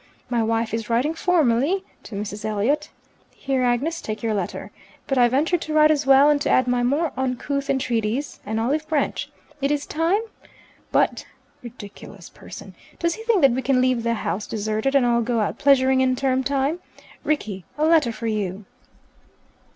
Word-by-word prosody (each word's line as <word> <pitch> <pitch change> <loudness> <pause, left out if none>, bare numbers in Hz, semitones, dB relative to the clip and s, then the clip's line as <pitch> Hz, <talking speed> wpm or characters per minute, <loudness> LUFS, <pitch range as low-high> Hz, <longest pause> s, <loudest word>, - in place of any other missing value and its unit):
My 235 -1 +1
wife 225 0 -1
is 225 -1 -3
writing 250 +7 +1
formally 325 0 +1 0.2
to 210 - -8
Mrs. 205 +1 -5
Elliot' 215 +7 0 0.5
(Here, 270 -2 -1
Agnes, 255 +7 0
take 215 +2 -6
your 225 -1 0
letter), 195 -4 -4 0.3
but 270 - -1
I 245 - +6
venture 300 +8 +1
to 310 - -5
write 305 0 +6
as 290 -2 0
well, 275 +1 +7
and 295 -1 +3
to - - 0
add 255 - +3
my 245 0 +1
more 285 +6 0
uncouth 270 +2 -2
entreaties.' 250 0 -1
An 220 +1 -3
olive 285 +8 -1
branch. 300 -3 -1 0.3
It 275 - +1
is 290 0 -1
time! 335 +7 0 0.7
But - - +1 0.3
(ridiculous 225 -4 -11
person!) - - -11 0.2
does 335 -1 0
he 445 - -9
think 455 -6 +3
that 275 - +7
we 255 +2 -1
can 260 0 +2
leave 255 -2 +2
the 235 0 0
House 210 -1 -3
deserted 220 +5 -2
and 270 -3 +4
all 235 -1 +2
go 235 0 -1
out 210 - -2
pleasuring 265 -1 +4
in 255 -1 +2
term 265 0 0
time? 280 +5 0 0.4
Rickie, 215 -11 -2
a 305 - +1
letter 315 -7 +4
for 230 - -7
you." 205 -3 -3
260 Hz, 180 wpm, -23 LUFS, 230-290 Hz, 0.7 s, well